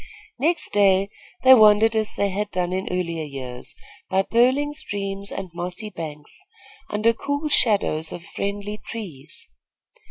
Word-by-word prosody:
Next 330 +6 0
day 195 -1 +4 0.3
they 260 0 +9
wandered 220 -1 +6
as 215 -1 -1
they 200 - +1
had 205 +2 -2
done 180 -1 -1
in 190 +1 -2
earlier 170 -3 -2
years 130 -4 -7 0.3
by 190 +1 +2
purling 260 +7 +2
streams 200 -6 -5
and 190 -2 -5
mossy 180 +5 -5
banks, 150 -4 -7 0.5
under 215 +2 +2
cool 285 +6 -2
shadows 195 - +2
of 170 - -7
friendly 205 +3 -4
trees. 165 -11 -6
200 Hz, 135 wpm, -23 LUFS, 175-220 Hz, 0.5 s, they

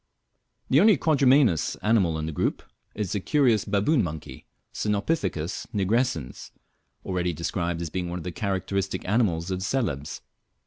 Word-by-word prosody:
The 135 - +6
only 210 -1 +6
quadrumanous 135 - +3
animal 100 -7 +2
in 80 - -3
the 80 - -3
group 75 - -1 0.3
is 105 -4 -3
the 105 - 0
curious 120 -2 +2
baboon 105 +8 +2
monkey, 80 -3 -7 0.3
Cynopithecus 100 - -1
nigrescens, 100 - -1 0.6
already 90 -2 -1
described 85 +1 -2
as 80 - -5
being 90 -2 -3
one 90 - -4
of 85 - -7
the 90 - -4
characteristic 100 0 -2
animals 95 -5 +1
of 95 0 -2
Celebes. 95 - -2
95 Hz, 140 wpm, -26 LUFS, 85-115 Hz, 0.6 s, The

